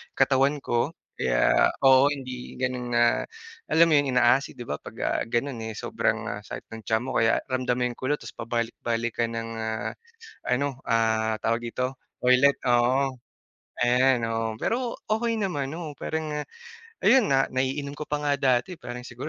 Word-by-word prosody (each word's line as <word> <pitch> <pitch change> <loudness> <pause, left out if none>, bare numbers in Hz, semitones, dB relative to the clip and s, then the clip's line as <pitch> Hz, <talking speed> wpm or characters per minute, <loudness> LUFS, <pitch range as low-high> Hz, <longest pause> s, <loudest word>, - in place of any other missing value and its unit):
katawan 135 +2 +3
ko 120 +1 0 0.3
kaya - - +3 0.2
oo, 135 +1 +7
hindi 130 -3 -5
gano'n 125 -1 -2
na, 120 - +4 0.7
alam 165 0 +4
mo - - +5
'yung 145 - 0
ina-acid 125 +3 +3
'di 120 - -7
ba 75 -10 -4
'pag - - -11
ga - - -1 0.2
gano'n, 120 +2 -1
eh, 110 - -6
sobrang - - -2
sakit - - -8
ng 110 -1 -8
tiyan 110 +1 +1
mo 130 - -4
kaya 115 0 +2
ramdam 130 -1 0
mo 125 - -1
'yung 120 -1 -3
kulo, 130 +3 0
ta's - - -10
pabalik-balik 115 0 -3
ka 115 - +2
ng, 115 0 -4
ah, 110 0 -3 0.5
ano, 130 +1 -1
ah, 110 -1 +1
tawag 115 +2 0
dito, 130 +2 -2 0.2
toilet, 125 +3 +4
oo. 130 +3 +3 0.7
Ayan, 125 0 +3
oo, 115 -1 -2
pero 240 0 -1
okey 230 +1 0
naman, 145 -9 -2
oo, 155 -4 -6
parang, 160 -1 -3
ah, - - -21 0.6
ayun 260 -6 +5
nga 135 0 +3
naiinom 135 +2 -2
ko 150 - -5
pa 150 0 -1
nga 145 -1 +1
dati 130 +6 +1
parang 120 0 -6
siguro 125 +4 -7
125 Hz, 170 wpm, -26 LUFS, 120-140 Hz, 0.7 s, oo